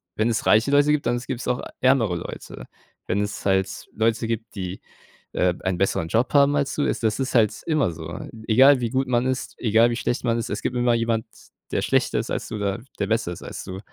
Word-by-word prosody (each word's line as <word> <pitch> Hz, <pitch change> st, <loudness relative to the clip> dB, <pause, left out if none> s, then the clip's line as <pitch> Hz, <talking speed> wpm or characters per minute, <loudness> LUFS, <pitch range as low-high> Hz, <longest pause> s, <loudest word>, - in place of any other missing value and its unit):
wenn 110 Hz, +2 st, +1 dB
es 115 Hz, -, -1 dB
reiche 110 Hz, +6 st, +4 dB
Leute 145 Hz, +1 st, +4 dB
gibt, 150 Hz, -3 st, +1 dB
dann 120 Hz, +1 st, +1 dB
s 120 Hz, -, -8 dB
gibt's 130 Hz, -2 st, -4 dB
auch 125 Hz, -, 0 dB, 0.2 s
ärmere 125 Hz, -8 st, +3 dB
Leute. -, -, -8 dB, 0.4 s
Wenn 100 Hz, +3 st, 0 dB
es 105 Hz, +6 st, -4 dB
halt 95 Hz, -1 st, 0 dB
Leute 115 Hz, +1 st, +1 dB
gibt, 115 Hz, -1 st, -4 dB
die, 95 Hz, -1 st, -5 dB, 0.5 s
äh, 90 Hz, -1 st, +2 dB
einen 95 Hz, -1 st, 0 dB
besseren 90 Hz, -3 st, 0 dB
Job 115 Hz, +8 st, +1 dB
haben 145 Hz, 0 st, +5 dB
als 140 Hz, -1 st, 0 dB
du 145 Hz, -, 0 dB
es -, -, -1 dB
das 110 Hz, 0 st, 0 dB
ist 135 Hz, -1 st, -2 dB
halt 110 Hz, -3 st, +4 dB
immer 155 Hz, -, +1 dB
so. 80 Hz, +1 st, -7 dB, 0.3 s
Egal, 130 Hz, +4 st, +6 dB
wie 115 Hz, -, -1 dB
gut 135 Hz, +1 st, 0 dB
man 120 Hz, 0 st, +1 dB
ist, 130 Hz, 0 st, -3 dB
egal, 115 Hz, 0 st, +4 dB
wie -, -, -1 dB
schlecht 120 Hz, 0 st, -2 dB
man 115 Hz, -1 st, +2 dB
ist, 115 Hz, +1 st, -4 dB
es 105 Hz, -, -3 dB
gibt 125 Hz, -, -2 dB
immer 120 Hz, -1 st, +3 dB
jemand, 115 Hz, -1 st, 0 dB, 0.5 s
der -, -, 0 dB
schlechter -, -, +1 dB
ist -, -, -4 dB
als -, -, -3 dB
du -, -, -4 dB
oder 100 Hz, -1 st, -2 dB, 0.2 s
der -, -, 0 dB
besser 110 Hz, -5 st, 0 dB
ist -, -, -11 dB
als -, -, -7 dB
du. 95 Hz, 0 st, -6 dB
115 Hz, 235 wpm, -23 LUFS, 100-130 Hz, 0.5 s, Egal